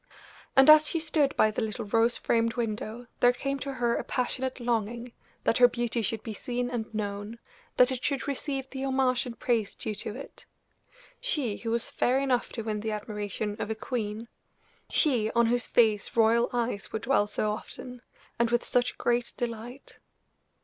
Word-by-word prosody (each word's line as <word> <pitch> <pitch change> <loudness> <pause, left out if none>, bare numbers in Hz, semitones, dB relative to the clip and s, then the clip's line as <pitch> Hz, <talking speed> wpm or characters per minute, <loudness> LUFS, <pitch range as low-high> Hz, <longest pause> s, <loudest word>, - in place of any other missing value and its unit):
And 270 0 +7
as 305 0 +9
she 330 - -1
stood 310 -3 +1
by 215 - +5
the 215 - -2
little 220 -1 -3
rose 225 +3 +3
framed 230 0 +1
window 225 0 -3
there 245 - +6
came 275 +2 -3
to 275 0 -4
her 240 -2 +1
a - - -2
passionate 260 +1 -2
longing 235 0 -2 0.3
that 230 - +2
her 245 - +9
beauty 240 -1 -1
should 220 +1 -2
be 220 - -5
seen 245 +3 -3
and 225 -3 -3
known, 205 +1 -4 0.4
that 250 +1 +6
it 255 -1 -4
should 280 -1 -1
receive 275 -1 -3
the 265 0 -4
homage 265 -1 +1
and 230 -2 -7
praise 230 -5 0
due 220 - -4
to 210 +1 -6
it. 275 - -10 0.7
She, 290 - -1
who 230 - -5
was 230 0 -1
fair 255 +2 +2
enough 270 -3 0
to 225 - -4
win 215 -1 -2
the 220 +1 -3
admiration 210 -1 -3
of - - -3
a 220 - -1
queen 220 -1 -4 0.6
she, 240 -8 +2
on 235 0 +5
whose 240 +1 +1
face 215 -4 +2
royal 230 +1 +4
eyes 235 -4 -2
would 220 - -4
dwell 235 -5 +3
so 210 0 -1
often, 245 +3 -8 0.4
and 235 -1 +3
with 240 0 +1
such 245 0 +1
great 240 0 0
delight! 240 +2 -6
235 Hz, 185 wpm, -28 LUFS, 220-255 Hz, 0.7 s, as